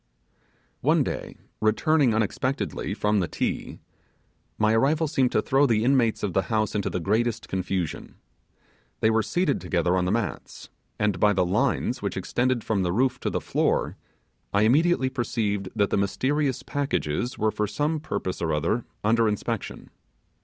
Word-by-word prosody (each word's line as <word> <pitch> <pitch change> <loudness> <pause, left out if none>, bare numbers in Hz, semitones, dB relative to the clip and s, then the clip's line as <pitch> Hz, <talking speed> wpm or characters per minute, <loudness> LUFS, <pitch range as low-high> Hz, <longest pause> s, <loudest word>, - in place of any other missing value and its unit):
One - - +3
day, - - -5 0.2
returning 120 +4 +3
unexpectedly 110 -1 -1
from 105 -1 +1
the 90 - 0
'Ti', - - -3 0.8
my 110 0 +3
arrival 150 +8 +2
seemed 135 -4 +1
to 110 - +2
throw 140 +2 +3
the 110 -3 +2
inmates 120 -3 +2
of 100 -4 -1
the 95 - +3
house 110 -2 0
into 100 -2 -1
the - - -2
greatest 110 +5 0
confusion. 95 -3 -3 0.9
They 110 - +4
were 110 0 +3
seated 170 - 0
together 90 0 +1
on 90 -1 +1
the 90 - 0
mats, 115 -2 -4 0.3
and 105 -4 0
by 105 +2 +4
the 90 -2 +2
lines 120 +5 0
which 100 - -3
extended 120 +5 0
from 105 -3 0
the 90 -1 0
roof 125 +6 +1
to - - -2
the - - -1
floor - - 0 0.6
I 100 +1 +3
immediately 135 +3 +3
perceived 105 -6 -2
that 100 -2 +1
the - - +2
mysterious 130 +7 0
packages 125 - -2
were 110 0 +1
for 105 0 -1
some 150 +9 -1
purpose 145 -11 -4
or 85 - 0
another 80 +10 0 0.2
under 115 +2 +3
inspection. 105 -1 -4
110 Hz, 160 wpm, -25 LUFS, 100-130 Hz, 0.9 s, They